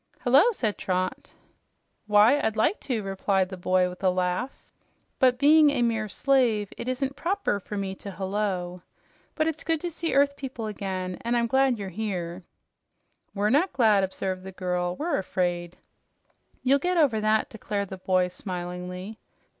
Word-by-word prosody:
"Hello," 265 +3 +6
said 225 - -2
Trot. 185 0 -2 0.8
"Why, 215 +7 +5
I'd 220 - -1
like 220 - +1
to," 235 -6 -2
replied 195 -1 0
the 190 - -6
boy 185 0 +2
with 180 +1 -9
a 190 - +5
laugh, 180 +7 -2 0.5
"but 255 -1 +4
being 300 +2 +6
a 270 -4 +1
mere 220 -2 0
slave, 235 -5 +1
it - - -7
isn't 265 +2 -2
proper 365 - -1
for 205 +1 -7
me 195 -1 -3
to 200 - -9
hello. 190 -2 -3 0.5
But 310 0 +1
it's 320 -1 -3
good 325 -1 0
to 350 - -3
see 330 -1 -2
earth 280 0 +4
people 255 -4 -6
again, 190 -3 -4
and 235 +1 0
I'm 235 - +2
glad 265 +1 +2
you're 200 -2 -5
here." 185 -3 -4 0.9
"We're 205 +2 +1
not 315 +8 +2
glad," 215 -6 +4
observed 190 0 -3
the 190 - -8
girl. 180 -1 -2
"We're 305 - -1
afraid." 175 -2 -2 0.9
"You'll 275 +2 +4
get 360 +4 0
over 260 -9 +3
that," 215 0 +2
declared 205 -3 -3
the 190 - -7
boy 185 -1 +1
smilingly. 180 +2 -6
210 Hz, 165 wpm, -26 LUFS, 185-260 Hz, 0.9 s, Hello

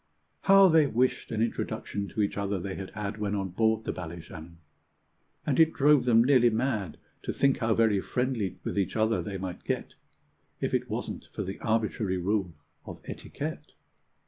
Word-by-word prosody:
How 195 0 +8
they 160 -4 +5
wished 125 +1 0
an 110 0 +1
introduction 100 -3 -3
to 105 +3 -1
each 100 - -1
other 100 -1 -1
they 95 +2 -4
had 95 0 -6
had 105 0 -4
When 105 -1 -1
on 95 -1 -2
board 110 +4 +1
the - - -3
Ballyshannon! 85 -1 -9 0.9
And 140 -1 +1
it 160 0 +5
drove 145 -2 +4
them 115 -2 +5
nearly 125 -2 +5
mad 110 - -1 0.2
To - - -3
think 135 -1 +2
how 115 -2 +1
very 110 -4 +3
friendly 120 -7 -2
with - - -2
each 95 - -1
other 110 0 +2
they 100 -2 -5
might 95 -1 -6
get, - - -3 0.7
If - - -2
it - - 0
wasn't - - -4
for - - -3
the 95 +1 -6
arbitrary 110 -3 0
rule 95 -2 -1 0.3
of - - -9
etiquette! - - -6
110 Hz, 175 wpm, -28 LUFS, 95-120 Hz, 0.9 s, How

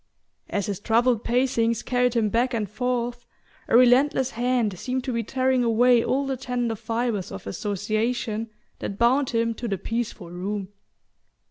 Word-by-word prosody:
As 200 - -1
his 200 -3 -3
troubled 230 +2 +2
pacings 235 -2 +1
carried 250 -1 +1
him 220 -2 +2
back 240 +3 +1
and 215 -2 -1
forth 245 +2 -2 0.4
a - - +5
relentless 255 +2 +4
hand 235 -5 0
seemed 255 0 -2
to 255 - -3
be 230 0 -1
tearing 260 +2 +1
away 235 +1 +4
all 275 +2 0
the 270 -1 -2
tender 245 -2 -2
fibres 225 -2 -2
of 95 - -8
association 215 - -2 0.3
that 200 - -5
bound 255 +4 +3
him 230 0 0
to 235 +2 -5
the 195 -3 -1
peaceful 225 -5 -4
room. 190 +2 -4
235 Hz, 155 wpm, -25 LUFS, 215-250 Hz, 0.4 s, a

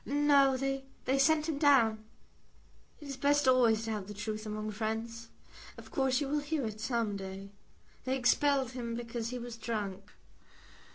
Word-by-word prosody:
"No; 280 -2 +4
they 270 0 -2
sent 310 +2 +3
him 305 -3 -2
down. 235 -7 +4 1.0
It 295 - -10
is 275 -1 -6
best 290 +1 +2
always 235 -4 +4
to 225 - -3
have 205 -3 -4
the 210 - -8
truth 215 +1 -4
among 215 0 -4
friends. 225 +2 -4 0.5
Of - - -12
course 265 -1 +1
you 285 - -2
will 295 +2 0
hear 295 -2 -2
it 215 -1 -5
some 230 -3 -1
day. 195 0 -8 0.5
They 260 +1 0
expelled 270 0 +2
him 235 -2 -4
because 235 -1 -4
he 250 - -4
was 240 -1 -7
drunk." 205 -4 -4
240 Hz, 165 wpm, -31 LUFS, 220-275 Hz, 1.0 s, No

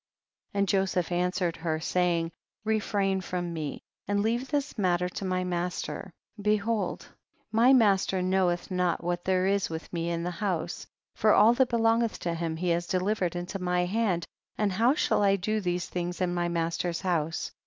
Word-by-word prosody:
44. - - -5
And 200 - +2
Joseph 190 -2 +1
answered 180 0 0
her, 160 -1 -1
saying, 170 -1 +1 0.3
refrain 200 -3 +1
from 175 -1 -3
mc, 155 -3 -5 0.2
and 205 0 +1
leave 235 +4 0
this 290 -1 -1
matter 180 -3 +1
to 180 - -6
my 185 0 0
master; 180 +1 -3 0.3
behold 210 -1 0 0.5
my 230 +4 +5
master 200 -6 +4
knoweth 185 -1 +1
not 180 -2 0
what 175 0 -2
there 185 0 +2
is 200 0 +1
with 160 +1 -7
me 170 0 -1
in 170 0 -2
the 180 - -2
house, 175 -2 -3 0.3
for 215 0 +3
all 225 +3 +7
that 255 0 +2
belongeth 230 -1 +2
to 170 - -1
him 165 -1 -2
he 180 +2 -1
has 170 +1 0
delivered 185 -1 0
into 175 +3 -4
my 180 -1 +1
hand, 190 -3 0 0.3
and 210 -2 +1
how 230 +8 +3
shall - - +2
I 200 -1 +4
do 215 +3 -1
these 180 -1 -1
things 175 0 -3
in 180 -1 0
my 175 0 0
master's 170 0 -1
house 165 -4 -1
180 Hz, 175 wpm, -28 LUFS, 175-205 Hz, 0.5 s, all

